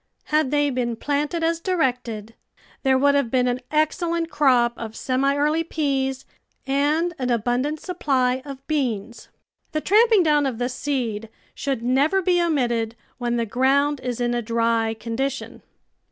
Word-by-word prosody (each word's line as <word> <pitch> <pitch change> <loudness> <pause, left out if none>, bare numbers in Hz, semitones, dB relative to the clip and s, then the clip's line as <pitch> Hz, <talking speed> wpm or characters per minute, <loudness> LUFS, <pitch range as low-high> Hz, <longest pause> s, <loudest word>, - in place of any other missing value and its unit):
Had 305 -3 +3
they 290 0 +2
been 245 -2 -1
planted 295 +6 -1
as 330 0 +1
directed, 250 - -1 0.5
there 265 -1 +3
would 285 +2 +4
have 280 -4 +1
been 250 0 +2
an 245 0 0
excellent 330 +2 0
crop 255 -5 +3
of 225 -1 -7
semi 270 +3 0
early 300 +3 +1
peas 270 -4 -1 0.4
and 295 +6 +1
an 255 -1 -1
abundant 245 +6 0
supply 265 -8 0
of 275 -2 -9
beans. 235 -7 -2 0.5
The 310 - +1
tramping 430 +1 +5
down 295 -3 +3
of 250 -4 -3
the 245 +1 -1
seed 240 -6 -3 0.2
should 270 -5 -3
never 275 +9 +2
be 360 -1 +2
omitted 240 -9 0 0.2
when 240 -1 -1
the 230 - 0
ground 275 +5 +2
is 250 -1 -4
in 240 0 0
a 240 - 0
dry 230 0 0
condition. 260 +5 -4
270 Hz, 155 wpm, -23 LUFS, 240-300 Hz, 0.5 s, tramping